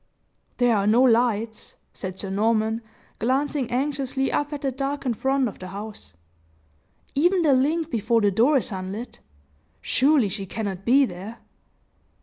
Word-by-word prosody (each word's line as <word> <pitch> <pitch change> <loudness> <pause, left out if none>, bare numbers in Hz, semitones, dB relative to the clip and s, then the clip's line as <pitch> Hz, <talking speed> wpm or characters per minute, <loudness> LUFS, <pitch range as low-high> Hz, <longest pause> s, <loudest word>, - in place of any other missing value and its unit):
"There 245 -2 +3
are 200 -1 +1
no 230 +4 +5
lights," 230 -3 +1 0.2
said 185 -1 -6
Sir 195 - -4
Norman, 220 +2 +1 0.4
glancing 265 +2 0
anxiously 270 +1 -1
up 290 +1 -1
at 290 -2 -5
the 270 - -1
darkened 275 -1 -2
front 265 +2 +1
of 215 - -8
the 185 - -7
house; 205 - -8 1.0
"even 350 +5 +3
the 295 -3 +4
link 310 +5 +1
before 230 +1 +1
the 205 -1 +3
door 245 +9 +4
is 250 - -2
unlit. 195 +5 -6 0.6
Surely 270 -3 +3
she 195 0 -4
cannot 195 -2 -5
be 270 +3 +5
there." 200 +3 -8
240 Hz, 145 wpm, -24 LUFS, 210-275 Hz, 1.0 s, no